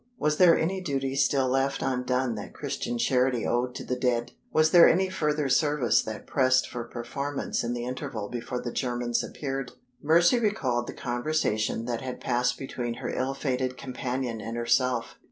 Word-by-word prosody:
Was 150 0 +1
there 180 -3 +7
any 185 +4 -1
duty 135 -5 -2
still 135 -1 +2
left 135 +1 0
undone 125 -1 0
that 105 -2 -8
Christian 120 - -3
charity 125 -1 +2
owed 125 +1 0
to - - -5
the 125 - -2
dead? 125 -2 0 0.2
Was 155 0 +3
there 175 -1 +8
any 190 +2 +2
further 150 -4 0
service 135 -3 +3
that 110 -1 -7
pressed 130 -1 +3
for 120 -1 -5
performance 140 +4 -3
in 120 +1 -2
the 120 0 -4
interval 120 -4 -4
before 125 +2 -4
the 120 - -3
Germans 120 -2 -1
appeared? 135 -2 -4 0.3
Mercy 170 +9 +4
recalled 130 - 0
the - - -5
conversation 120 -4 -1
that 120 -1 -2
had 130 -1 -5
passed 125 0 0
between 120 -3 -4
her - - -4
ill 135 +1 -1
fated 130 -2 -2
companion 125 -3 -3
and 115 +1 -5
herself. 120 0 0
130 Hz, 170 wpm, -27 LUFS, 120-140 Hz, 0.3 s, there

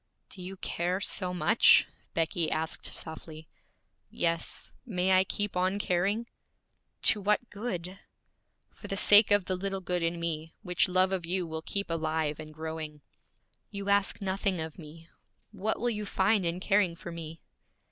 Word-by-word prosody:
'Do 185 - -9
you 190 +2 -7
care 180 +1 -2
so 185 -2 -2
much?' 180 +5 +5 0.3
Becky 165 0 0
asked 160 +1 -2
softly. 160 0 -8 0.6
'Yes. 170 -1 -2
May 190 -6 0
I 185 0 +6
keep 205 +1 -2
on 185 +2 +1
caring?' 200 +4 0 0.8
'To 210 - +5
what 210 +4 +1
good?' 195 -4 -5 0.7
'For - - -11
the 195 - -3
sake 205 +2 +7
of 205 -2 +4
the 185 - -1
little 195 +1 -3
good 180 -1 -2
in 165 +1 -1
me, 160 -1 -3
which 180 -1 +2
love 185 +1 +3
of 180 -3 -2
you 180 0 0
will 160 -1 -5
keep 200 +2 -2
alive 155 -2 -1
and 155 0 -8
growing.' 155 -1 -6 0.7
'You 200 -1 -5
ask 200 0 +3
nothing 195 -1 -1
of 160 +2 -5
me. 160 +1 -12 0.4
What 215 +1 -2
will 240 0 +1
you 210 -2 -4
find 195 -1 +2
in 170 +2 -1
caring 195 -3 +2
for 170 0 -8
me?' 165 -1 -7
180 Hz, 160 wpm, -29 LUFS, 165-200 Hz, 0.8 s, sake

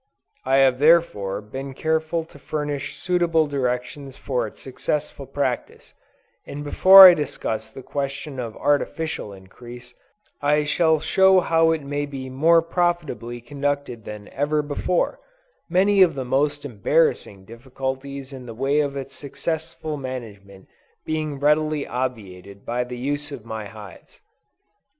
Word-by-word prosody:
I 130 +1 +2
have 135 -2 +4
therefore, 140 - +3
been 135 +6 -7
careful 160 +2 -1
to 160 -3 -17
furnish 145 -1 -4
suitable 175 -3 +1
directions 135 0 -3
for 125 -4 -2
its - - -13
successful 140 +1 -4
practice; 135 -3 -3 0.5
and 145 +1 -7
before 190 +6 +9
I 180 - +8
discuss 110 -8 -3
the 130 +4 -11
question 140 0 -4
of 115 -3 -5
Artificial 145 -3 -1
Increase, 120 +6 -12 0.5
I 150 +1 +2
shall 160 +1 +2
show 190 +4 +4
how 165 -2 +3
it 160 -2 0
may 145 +1 -3
be 130 -2 -7
more 165 +5 +4
profitably 165 -9 -2
conducted 140 -2 -3
than 105 -1 -9
ever 150 +2 0
before; 145 +4 -1 0.5
many 195 +3 +3
of 170 -5 +5
the 130 -2 -4
most 145 +3 0
embarrassing 110 -4 0
difficulties 130 +3 -6
in 130 -2 -9
the 115 - -8
way 135 +4 +1
of 140 -2 -1
its 135 0 -7
successful 160 +1 -4
management 105 -8 -8 0.4
being 155 -3 -3
readily 150 0 +1
obviated 100 -6 -6
by 120 +1 -1
the 125 0 -8
use 145 +3 -3
of 130 -6 -8
my 110 -2 -6
hives. 110 -2 -13
140 Hz, 135 wpm, -23 LUFS, 125-155 Hz, 0.5 s, before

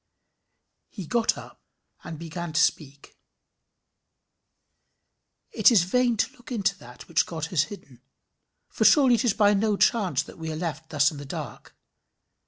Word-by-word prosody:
"] - - -53
He 185 -5 -6
sat 230 +3 +1
up - - -12 0.4
and 160 - -8
began 170 +1 -7
to 155 - +1
speak. 140 -2 -2 2.3
It - - +5
is 205 -7 +5
vain 240 +5 +1
to - - 0
look 245 - -15
into 200 -4 0
that 125 +1 -14
which - - +1
God 160 -2 -4
has 155 -3 +2
hidden; 140 - -13 0.7
for - - -2
surely 270 -5 +6
it 240 +2 +1
is 225 - +2
by 205 -1 +4
no 205 0 +1
chance 205 -5 +1
that - - -14
we 160 0 -5
are - - -5
left 160 -2 -5
thus 145 0 +2
in 150 - -10
the 145 - -8
dark. 135 - -8
175 Hz, 165 wpm, -25 LUFS, 155-220 Hz, 2.3 s, surely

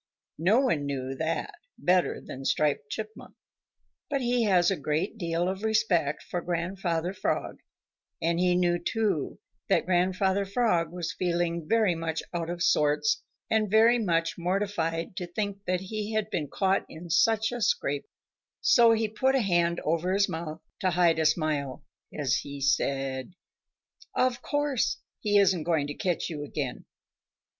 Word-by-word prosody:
No 200 +10 +4
one 155 - 0
knew 135 -1 -3
that 160 +4 -2 0.2
better 180 0 +2
than 135 - -9
Striped 140 0 0
Chipmunk, 220 +4 -7 0.7
but 280 -2 0
he 245 -2 +1
has 185 -3 +4
a - - +1
great 155 +7 -2
deal 170 -1 0
of 190 +1 -3
respect 205 -10 +1
for 175 - -4
Grandfather 175 0 -2
Frog, - - -2 0.6
and 170 0 0
he 180 0 +3
knew 175 -1 +2
too 195 -4 -1 0.3
that - - +3
Grandfather 185 +2 +2
Frog 195 -6 +1
was 175 +1 -4
feeling 170 -2 -1
very 220 -5 +3
much 165 -1 -3
out 170 -1 -2
of 175 0 -2
sorts 150 -3 +2 0.3
and 220 -2 +1
very 225 +3 +5
much 165 -5 0
mortified 175 -2 -1
to 180 -3 -3
think 200 +2 -4
that 180 0 0
he 215 +2 -4
had 215 0 -1
been 155 -4 -1
caught 190 +5 +1
in 165 +1 -9
such 220 +9 +3
a 245 -1 -4
scrape, 145 -8 0 0.5
so 235 - +6
he 225 0 +1
put 260 +5 +1
a 265 - +3
hand 175 -4 +2
over 170 +4 0
his 200 +1 +3
mouth 160 -3 -5 0.2
to 190 - +1
hide 170 -2 +3
a 160 - +4
smile 150 -3 -1 0.3
as 140 -5 0
he 140 0 -6
said: 135 +1 0 0.8
"Of 255 -1 +1
course 290 -4 0 0.2
he 205 -1 +2
isn't 190 -4 +4
going 160 -2 +1
to 145 - -4
catch 175 +2 -1
you 155 -4 -5
again. 140 -3 -4
175 Hz, 155 wpm, -28 LUFS, 160-205 Hz, 0.8 s, so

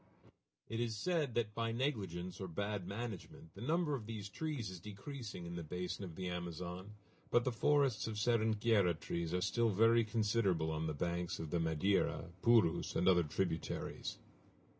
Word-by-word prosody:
_ - - -21 0.4
It 115 - -3
is 115 -2 -1
said 150 - 0
that, 110 -3 0
by 115 0 -1
negligence 100 - -2
or 95 - -3
bad 100 +1 -2
management, 100 -6 -6
the 100 - -10
number 160 +4 +1
of 115 -6 -3
these 105 -3 -5
trees 135 -4 -3
is 90 - -7
decreasing 105 - -7
in 85 0 -5
the 85 - -3
basin 90 +5 -4
of 85 -4 -7
the 95 +1 -3
Amazon, 90 +3 -5 0.3
but 120 - +4
the 130 - +1
forests 135 -2 +3
of 110 - -3
seringueira 110 -4 +3
trees 85 -1 -2
are 90 0 +1
still 115 +5 +2
very 115 +3 +5
considerable 105 -7 +1
on 80 0 -1
the 75 - -2
banks 85 +2 -1
of 80 -2 -5
the 85 - +1
Madeira, 80 +3 +1
Purus, 115 -8 +4
and 90 - +2
other 90 -2 +6
tributaries. 80 +1 -2
100 Hz, 175 wpm, -37 LUFS, 90-115 Hz, 0.4 s, other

